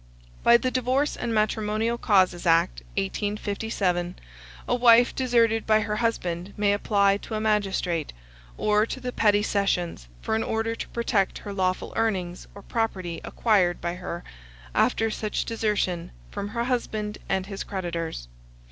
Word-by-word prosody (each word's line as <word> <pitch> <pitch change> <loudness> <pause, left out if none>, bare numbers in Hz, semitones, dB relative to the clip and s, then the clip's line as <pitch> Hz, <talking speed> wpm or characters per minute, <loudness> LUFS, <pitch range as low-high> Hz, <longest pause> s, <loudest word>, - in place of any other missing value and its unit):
By 235 0 +7
the 255 +1 -1
Divorce 255 +3 +1
and 235 - -3
Matrimonial 220 +1 0
Causes 185 -5 +3
Act, 165 - +3 0.2
1857, 200 - -1 0.5
a - - +1
wife 240 0 +6
deserted 230 -3 +2
by 215 0 +4
her 210 0 -2
husband 185 -5 -2
may 205 -1 +3
apply 200 -1 +3
to 220 - -6
a - - -1
magistrate, 195 -6 0 0.5
or 210 +1 +2
to 260 - -5
the 250 -1 -4
petty 205 -3 +3
sessions, 180 - -1 0.2
for - - -1
an 220 - +2
order 225 +1 -1
to - - -6
protect 220 -4 0
her 205 - -7
lawful 185 -1 -1
earnings 185 -6 -1
or 200 - -11
property 185 -8 -2
acquired 195 -6 +2
by 170 0 -2
her 175 -1 -6 0.5
after 225 0 +2
such 215 0 -2
desertion, 210 -6 -1 0.2
from 200 - -4
her 235 +3 -2
husband 220 -4 -2
and 190 -1 0
his 195 0 -5
creditors. 170 - -4
210 Hz, 145 wpm, -26 LUFS, 185-225 Hz, 0.5 s, By